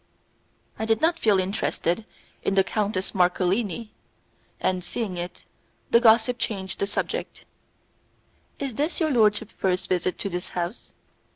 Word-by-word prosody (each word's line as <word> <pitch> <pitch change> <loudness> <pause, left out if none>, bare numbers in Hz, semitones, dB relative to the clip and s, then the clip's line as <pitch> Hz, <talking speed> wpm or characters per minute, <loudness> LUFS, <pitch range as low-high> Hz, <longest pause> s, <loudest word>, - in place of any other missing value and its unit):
I 220 - -1
did 225 0 +2
not 330 +3 +2
feel 210 -3 +4
interested 185 +1 -1 0.4
in 195 - 0
the 195 - +5
Countess 200 -1 -1
Marcolini, 190 +4 +1 0.7
and, 185 -1 0
seeing 200 0 -3
it, 175 0 -6 0.5
the 235 - +7
gossip 235 +1 +5
changed 190 -4 -3
the 200 - 0
subject. 205 - -3 1.1
"Is 275 -3 -3
this 295 +8 -1
your 315 -3 +2
lordship's 220 -3 +3
first 185 -1 0
visit 180 0 0
to - - -1
this 180 -2 -3
house? 175 +6 -4
200 Hz, 135 wpm, -25 LUFS, 185-225 Hz, 1.1 s, the